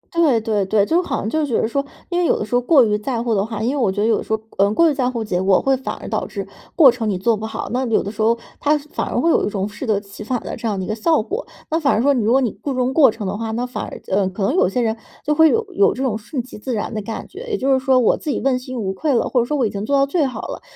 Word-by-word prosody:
对 305 -9 +4
对 215 -2 0
对， 200 +1 +2
就 335 +9 +2
好 360 - -3
像 - - -3
就 315 +5 0
觉 265 -6 0
得 - - +1
说， 275 +4 -1 0.3
因 350 0 0
为 355 - +2
有 - - +2
的 - - -3
时 215 - -10
候 245 - +4
过 270 +1 +5
于 210 -1 +1
在 235 +1 -2
乎 235 -2 0
的 195 -2 +2
话 220 0 -5
因 240 - +1
为 - - -2
我 195 - +2
觉 195 - -4
得 210 - +2
有 230 - +2
时 - - -10
候， 220 - +1 0.2
呃， 200 +1 +4
过 335 +10 +4
于 - - -1
在 260 -3 0
乎 235 -3 -3
结 180 -4 -1
果 190 -1 +4
会 270 0 +2
反 260 - -5
而 - - -9
导 - - -2
致 - - -6 0.3
过 290 -7 +8
程 230 -3 -3
你 195 - 0
做 230 +5 +2
不 220 +1 -5
好， 220 0 -5
那 255 +1 0
有 225 - +2
的 200 - -4
时 220 0 -5
候 230 +2 +3 0.2
它 300 +1 +2
反 295 +3 -5
而 - - -1
会 335 - +3
有 - - +3
一 - - -1
种 200 -1 -2
适 210 +5 -7
得 210 -2 +2
其 200 +1 -11
反 245 +3 -2
的 - - -5
这 230 - -4
样 210 -3 -1
的 185 - -3
一 - - -8
个 215 - -1
效 305 +9 +2
果， 425 - -5 0.2
那 320 - +2
反 285 -4 +2
而 - - +1
说 285 +1 +4
你 245 -5 0
如 220 - +2
果 260 - +5
你 240 -5 0
注 280 -2 -2
重 255 +1 0
过 300 -2 +6
程 215 -1 -5
的 190 +1 -2
话， 225 +1 -4
那 235 +3 -2
反 250 - -5
而 - - -8
呃， 195 0 +1
可 195 +2 -4
能 200 - +1
有 365 - +3
些 245 +6 -1
人 220 -1 0 0.3
就 300 - +1
会 320 +1 +6
有 455 +5 +1
有 405 +3 +4
这 265 - -3
种 250 -6 0
顺 240 +4 -4
其 240 - -11
自 250 +2 -3
然 215 +2 -3
的 215 - -2
感 220 +2 -6
觉。 445 +6 -10
也 420 - 0
就 270 +1 +2
是 260 0 +1
说 265 -1 +4
我 235 - +3
自 310 - -6
己 - - 0
问 260 -1 +1
心 255 -1 -6
无 190 -3 -2
愧 290 +10 -1
了， - - +1
或 250 - +2
者 - - -1
说 295 +4 -1
我 255 - +2
已 215 - -1
经 200 0 -4
做 280 +5 +1
到 275 - +4
最 290 0 +1
好 245 -4 -6
了， - - -6
240 Hz, 380 characters per minute, -20 LUFS, 215-280 Hz, 0.3 s, 过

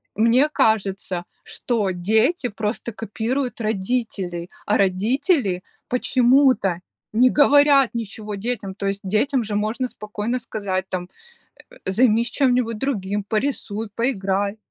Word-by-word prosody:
мне 235 +7 +4
кажется, 195 -8 0 0.2
что 215 -6 -1
дети 220 - +1
просто 215 +2 -3
копируют 230 +3 -3
родителей, 195 -5 -2 0.2
а - - +2
родители 200 - +1 0.2
почему-то 250 -7 +3 0.3
не 250 +3 +5
говорят 285 -2 +5
ничего 215 -2 -5
детям. 200 -2 -3
То 200 0 -3
есть 195 0 -2
детям 225 +6 +1
же 210 -1 -4
можно 220 +5 -1
спокойно 215 +3 -4
сказать, 195 -5 -3
там: 180 -1 -4 0.8
"Займись 230 +3 +3
чем-нибудь 245 -5 +1
другим, 205 -6 -2
порисуй, 220 -1 -2
поиграй". 200 -4 -1
220 Hz, 110 wpm, -22 LUFS, 195-250 Hz, 0.8 s, не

